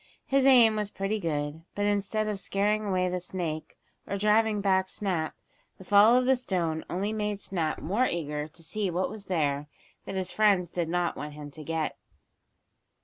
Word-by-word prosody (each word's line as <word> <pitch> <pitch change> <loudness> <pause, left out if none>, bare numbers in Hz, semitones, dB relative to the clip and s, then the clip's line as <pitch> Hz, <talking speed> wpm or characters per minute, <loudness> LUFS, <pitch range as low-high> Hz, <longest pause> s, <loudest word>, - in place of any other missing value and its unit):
His 275 0 +3
aim 235 -5 +7
was 210 -1 -1
pretty 205 +2 -2
good, 150 -3 -2
but 205 - 0
instead 205 +1 0
of 210 -2 -2
scaring 210 +3 0
away 185 -2 +1
the 180 0 -1
snake, 170 -3 -5 0.3
or 200 - -2
driving 210 +1 +3
back 190 -1 +2
Snap, 175 -6 -2 0.4
the - - -12
fall 205 +5 +6
of 255 - +2
the 265 +1 +5
stone 175 -10 -2
only 200 +4 -1
made 210 -2 -2
Snap 170 -6 -2
more 220 +9 +1
eager 150 -3 -3
to 160 +2 -13
see 200 +4 -2
what 180 +3 -1
was 210 -2 -8
there 150 -5 0 0.4
that - - -5
his 190 -1 -1
friends 195 -5 +3
did 170 -2 -2
not 175 0 0
want 150 0 -6
him 145 -1 -9
to 155 +2 -9
get. 160 0 -2
190 Hz, 185 wpm, -28 LUFS, 165-210 Hz, 0.4 s, aim